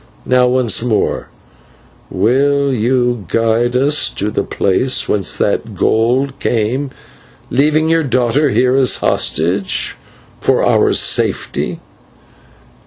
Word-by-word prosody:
Now, 125 0 +3
once 125 -4 +1
more, 115 -3 -1 0.8
will 140 +7 +1
you 120 -2 0
guide 115 +3 0
us 140 +4 +2
to 105 +2 -4
the - - -1
place 115 +7 0
whence 100 -4 -1
that - - -2
gold 125 +5 0
came, 120 +5 -1 0.6
leaving 150 +5 +2
your 165 0 +2
daughter 130 +2 +1
here 125 0 +2
as 130 -1 +3
hostage 90 +5 -1 0.4
for - - +1
our - - +2
safety?" - - 0
125 Hz, 105 wpm, -15 LUFS, 110-135 Hz, 0.8 s, Now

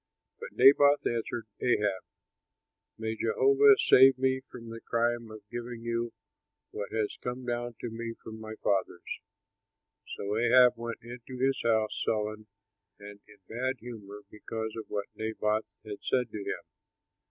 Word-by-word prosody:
But 475 +1 -8
Naboth 145 +1 +6
answered 115 0 -2 0.2
Ahab, 105 -6 +1 1.0
"May 110 0 -3
Jehovah 420 - +5
save 135 - +7
me 130 0 +1
from 115 -2 -10
the 115 0 -8
crime 115 -1 0
of 110 -2 -12
giving 120 -1 -6
you 115 0 -2 0.6
what 100 - -5
has 110 -2 -1
come 125 +1 -4
down 120 -1 -3
to 120 - -3
me 115 0 -5
from 110 0 -10
my 110 0 -7
fathers!" 95 -3 -1 0.9
So 100 +1 -4
Ahab 125 +1 +6
went 115 -1 -6
into 125 +2 -9
his 135 +1 +1
house 110 -2 +1
sullen 110 0 -2 0.5
and 100 0 -11
in 105 - -17
bad 130 +3 -2
humor 105 -4 -9
because 110 +1 -5
of 110 - -6
what 100 -1 -2
Naboth 110 0 -1 0.2
had 105 -1 -7
said 125 -3 0
to 105 - -5
him. 100 - -4
115 Hz, 145 wpm, -30 LUFS, 110-125 Hz, 1.0 s, save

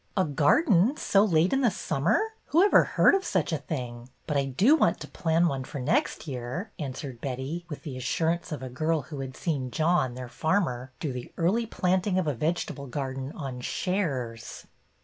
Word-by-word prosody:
A 190 - +4
garden 180 - +3
so 200 0 +3
late 175 -2 +3
in 270 - +2
the 245 - +4
summer? 165 -5 +1 0.3
Who 335 +5 +4
ever 405 - +6
heard - - +4
of 390 -1 +2
such 175 -3 0
a 155 - 0
thing? 125 -4 -6 0.2
But 150 - -2
I 140 -1 +2
do 190 - +4
want - - +2
to - - -6
plan 170 -1 +1
one 135 -4 -2
for 135 - -7
next 240 - 0
year," 135 - -5
answered 130 -3 -6
Betty, 140 +6 -4
with 150 - -7
the 140 -5 -6
assurance 165 +7 -1
of 150 -3 -4
a 130 - -5
girl 155 +4 0
who 145 +2 -8
had 130 -1 -6
seen 140 -7 -2
John, 155 -3 +1
their 125 0 -6
farmer, 130 -4 -1
do 145 -5 -3
the 125 -1 -7
early 210 +8 +1
planting 185 -1 +1
of 185 - +1
a 150 - 0
vegetable 150 0 -2
gar 130 +1 -3
den 135 +1 -5
'' - - -16
on 130 -4 -5
shares." 130 - -3
150 Hz, 200 wpm, -27 LUFS, 130-180 Hz, 0.3 s, ever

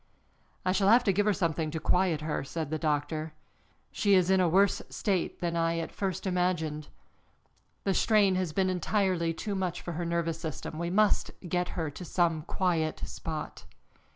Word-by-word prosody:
"I 185 - +3
shall 195 +1 +2
have 235 +3 +6
to 200 -5 +2
give 205 +3 +1
her 210 - +4
something 165 -4 -1
to 160 +1 -3
quiet 180 -2 +1
her," 155 -2 -2
said 155 +1 -4
the 155 - -1
doctor. 155 0 -1 0.6
"She 200 -1 +3
is 185 0 +3
in 190 - +4
a 180 -2 +3
worse 195 +4 +3
state 190 -5 -1
than 170 -1 -1
I 165 0 +1
at 165 - -3
first 190 -2 -3
imagined. 175 -5 -1 1.0
The 195 - +1
strain 205 -1 +4
has 185 -3 -1
been 185 +3 +1
entirely 185 -2 +1
too 200 +5 -4
much 185 -3 -2
for 175 - -6
her 170 +1 -3
nervous 170 -1 -1
system. 160 0 -5
We 170 0 -2
must 210 +3 +2 0.2
get 180 +1 0
her 160 -3 -1
to 180 - -9
some 170 -3 +1
quiet 165 -1 -1
spot." 155 -2 -6
175 Hz, 180 wpm, -29 LUFS, 160-190 Hz, 1.0 s, have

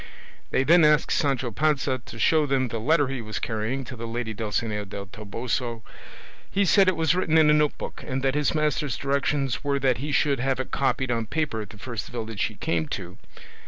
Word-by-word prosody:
They 130 - +2
then 170 +4 +6
asked 150 -1 +4
Sancho 135 -6 +1
Panza 135 -1 0
to 115 - -9
show 155 +6 +3
them 130 -2 +1
the 115 - -3
letter 145 +4 +3
he 135 -2 -4
was 110 -1 -5
carrying 110 +5 -2
to 125 - -8
the 115 0 -6
lady 115 -1 -3
Dulcinea 105 0 -2
del 100 0 -7
Toboso. 115 +4 -4 0.7
He 200 +1 +1
said 190 +3 +5
it 185 - +3
was 160 0 +2
written 180 -3 +2
in 155 -1 +6
a - - +5
note 150 -1 +2
book, - - -7
and 130 0 -2
that 135 -1 +2
his 150 +2 +1
master's 150 -2 0
directions 140 -1 0
were 140 -1 +1
that 130 -3 +1
he 145 +3 -3
should 140 -2 +2
have 135 0 0
it 130 - -4
copied 130 -2 0
on 115 -2 -1
paper 145 -7 -1
at 105 - -8
the 105 - -12
first 115 0 -5
village 110 -5 -3
he - - -5
came 80 -2 -1
to. 90 +4 -6
130 Hz, 215 wpm, -25 LUFS, 115-150 Hz, 0.7 s, then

